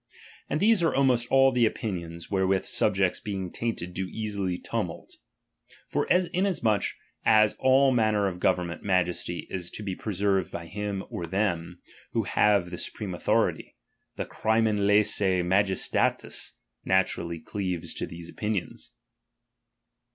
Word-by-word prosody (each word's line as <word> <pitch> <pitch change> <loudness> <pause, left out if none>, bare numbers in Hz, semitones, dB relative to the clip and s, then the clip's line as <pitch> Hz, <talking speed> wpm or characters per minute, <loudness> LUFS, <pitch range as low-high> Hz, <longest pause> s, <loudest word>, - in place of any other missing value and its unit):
And 150 - 0
these 215 0 +4
are 165 - +2
almost 125 -3 +2
all 135 0 +6
the 120 -3 +3
opinions, 85 -7 -5
wherewith 95 -1 +1
subjects 95 -3 +2
being 95 -4 -4
tainted 110 -7 -3
do 95 +1 -3
easily 100 -3 -3
tumult. - - -4
And - - -26 0.3
forasmuch 180 - +2 0.4
as 110 -1 +5
in - - -19
all 130 +1 +5
manner 110 -4 +2
of 90 -2 -4
government 85 -1 0
majesty 90 -2 0
is 90 -2 -4
to 105 - -7
be 95 -2 -3
preserved 100 -2 0
by 85 - -6
him 100 +2 -4
or 85 - -4
them, 90 -2 -2 0.3
who - - +1
have 100 -4 +2
the 90 - -5
supreme 100 -4 -5
authority; 85 - 0 0.4
the - - -3
crimen 110 -1 +1
Itssce 100 -3 +3
ma 95 +3 +4
Jestatis 95 -2 -1 0.3
naturally 85 -3 +1
cleaves 90 0 -4
to - - -4
these 85 0 -9
opinions. 105 0 -4
100 Hz, 135 wpm, -27 LUFS, 90-110 Hz, 0.4 s, all